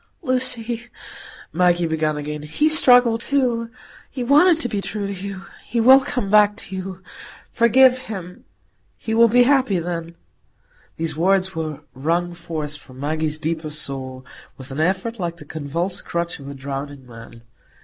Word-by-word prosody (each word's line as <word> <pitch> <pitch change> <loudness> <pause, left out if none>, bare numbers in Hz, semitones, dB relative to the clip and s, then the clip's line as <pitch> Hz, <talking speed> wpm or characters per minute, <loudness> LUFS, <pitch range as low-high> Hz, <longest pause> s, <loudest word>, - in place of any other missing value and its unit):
"Lucy," 245 -3 0 0.7
Maggie 175 0 +2
began 155 -2 -1
again, 150 0 -5
"he 150 - 0
struggled 245 -7 +5
too. 240 -4 0 0.4
He 255 - -5
wanted 305 +6 +5
to - - +1
be 210 -4 -3
true 205 0 -4
to 200 - -4
you. 195 0 -7 0.2
He 235 - -2
will 260 +4 +8
come 255 -5 -3
back 210 -1 +5
to 190 - -8
you. 185 0 -7 0.5
Forgive 255 +2 +5
him—he 100 - -9
will 230 +1 +6
be 245 +2 +5
happy 260 -6 +3
then——" 170 -1 -4 0.8
These 165 -1 -2
words 190 +3 +1
were 155 -2 -5
wrung 170 +6 -1
forth 155 -3 -6
from 130 -3 -15
Maggie's 155 +1 -2
deepest 155 -1 -3
soul, 130 -2 -1 0.3
with 130 0 -10
an 135 - -5
effort 190 +7 -1
like 170 -2 -3
the 150 - -12
convulsed 160 +5 -4
clutch 170 -1 -3
of 140 - -10
a 140 - -8
drowning 140 0 -6
man. 115 -1 -13
175 Hz, 155 wpm, -21 LUFS, 150-230 Hz, 0.8 s, will